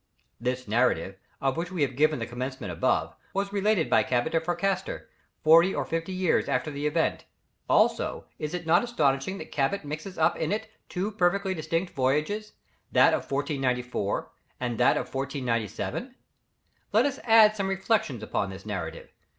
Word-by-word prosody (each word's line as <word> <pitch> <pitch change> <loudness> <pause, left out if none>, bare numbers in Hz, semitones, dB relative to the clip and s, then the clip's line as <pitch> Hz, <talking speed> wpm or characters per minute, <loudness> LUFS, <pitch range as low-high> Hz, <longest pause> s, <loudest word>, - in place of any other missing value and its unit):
This 125 +1 -2
narrative, 100 -5 +1 0.2
of 135 -1 0
which 175 +2 -3
we 175 -5 0
have 130 -2 -1
given 155 +2 +3
the 115 - -3
commencement 125 -5 -5
above, 85 - 0 0.2
was 200 +1 -1
related 205 -4 +2
by - - +4
Cabot 120 -1 0
to 165 - +3
Fracastor, 190 - -2 0.4
forty 165 +4 +6
or - - -1
fifty 165 +2 -3
years 185 -2 +1
after 125 +4 0
the 145 +1 -2
event. 150 - 0 0.4
Also, - - +2
is 150 +3 -3
it 175 -1 -5
not 170 +5 +4
astonishing 155 - 0
that - - -9
Cabot 150 +6 0
mixes 155 +6 -6
up 160 - +3
in 160 - -1
it 220 +1 -3 0.2
two 195 +4 -2
perfectly 195 -1 +1
distinct 165 +2 -2
voyages, 155 +10 0 0.4
that - - +5
of - - -2
1494, 125 -6 -1 0.3
and 120 -3 -3
that - - +4
of - - -4
1497? 135 - -3 0.8
Let - - +4
us 280 -1 -1
add 220 -2 +6
some 200 -2 -1
reflections 195 - 0
on 100 -2 -1
this 95 +1 -9
narrative. 90 -6 -5
155 Hz, 165 wpm, -27 LUFS, 125-190 Hz, 0.8 s, forty